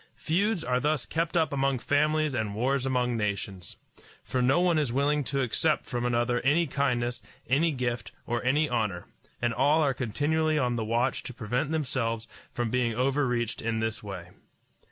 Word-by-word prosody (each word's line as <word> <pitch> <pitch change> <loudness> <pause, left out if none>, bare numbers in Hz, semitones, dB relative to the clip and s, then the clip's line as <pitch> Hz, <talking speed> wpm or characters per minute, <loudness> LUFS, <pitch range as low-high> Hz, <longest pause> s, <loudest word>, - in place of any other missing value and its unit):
Feuds 190 +3 0
are 125 0 +1
thus 150 -1 0
kept 165 +2 -1
up 160 -3 +2
among 135 -1 +1
families 150 +3 +1
and 110 -4 -2
wars 130 +3 0
among 125 -2 +1
nations. 100 -4 -3 0.5
For 125 - -1
no 130 +6 +4
one 175 -3 +3
is 145 -6 0
willing 145 +3 +1
to 140 0 0
accept 150 +6 +1
from 120 -2 -3
another 120 0 +1
any 155 +5 +3
kindness, 125 -4 -1 0.3
any 150 +6 +3
gift, 120 -5 -2
or 120 +1 -2
any 145 +5 +2
honor, 105 -9 -1 0.4
and 120 -1 +2
all 145 +6 +3
are 140 -2 +2
continually 150 +6 0
on 125 -4 +1
the 115 - -1
watch 120 +4 0
to 125 - -9
prevent 125 +5 -1
themselves 125 -7 -1 0.2
from 120 -2 -2
being 120 -2 +1
overreached 125 -2 0
in 115 0 -1
this 110 0 -2
way. 95 -4 -8
125 Hz, 175 wpm, -28 LUFS, 120-145 Hz, 0.5 s, no